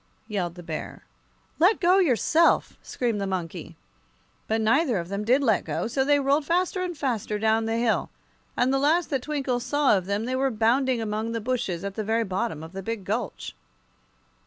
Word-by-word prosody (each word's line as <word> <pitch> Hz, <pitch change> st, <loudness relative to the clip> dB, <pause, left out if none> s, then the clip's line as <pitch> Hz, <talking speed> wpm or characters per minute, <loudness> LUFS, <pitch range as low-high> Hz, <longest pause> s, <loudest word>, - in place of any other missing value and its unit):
yelled 180 Hz, -6 st, -3 dB
the 175 Hz, -, -10 dB
Bear. 160 Hz, -2 st, -6 dB, 0.6 s
"Let 370 Hz, +7 st, +4 dB
go, 365 Hz, +1 st, +4 dB
yourself!" 325 Hz, -, +3 dB
screamed 230 Hz, -5 st, -2 dB
the 195 Hz, -, -1 dB
monkey. 180 Hz, -4 st, -5 dB, 0.7 s
But 220 Hz, +1 st, 0 dB
neither 240 Hz, +3 st, +2 dB
of 170 Hz, 0 st, -4 dB
them 200 Hz, +1 st, -3 dB
did 255 Hz, +6 st, +3 dB
let 220 Hz, -6 st, +2 dB
go, -, -, -3 dB
so 265 Hz, +4 st, 0 dB
they 290 Hz, +1 st, +3 dB
rolled 280 Hz, +2 st, +2 dB
faster 360 Hz, +4 st, 0 dB
and 355 Hz, -3 st, -4 dB
faster 235 Hz, -7 st, -2 dB
down 220 Hz, +1 st, +1 dB
the 225 Hz, 0 st, -1 dB
hill, 230 Hz, -2 st, +1 dB, 0.5 s
and 255 Hz, +2 st, +2 dB
the 270 Hz, -, +2 dB
last 315 Hz, +5 st, +2 dB
that 270 Hz, -3 st, 0 dB
Twinkle 270 Hz, -4 st, -2 dB
saw 270 Hz, 0 st, +2 dB
of 185 Hz, -2 st, -2 dB
them 200 Hz, +2 st, -1 dB
they 255 Hz, +1 st, -2 dB
were 270 Hz, +1 st, +1 dB
bounding 240 Hz, +2 st, +1 dB
among 220 Hz, +1 st, -3 dB
the 230 Hz, -, -1 dB
bushes 210 Hz, -7 st, -2 dB
at 200 Hz, -1 st, -4 dB
the 215 Hz, -, -3 dB
very 225 Hz, +2 st, +1 dB
bottom 185 Hz, -6 st, -3 dB
of 160 Hz, -, -9 dB
the 195 Hz, +1 st, -6 dB
big 220 Hz, -1 st, -5 dB
gulch. 220 Hz, +5 st, -3 dB
230 Hz, 195 wpm, -25 LUFS, 205-275 Hz, 0.7 s, Let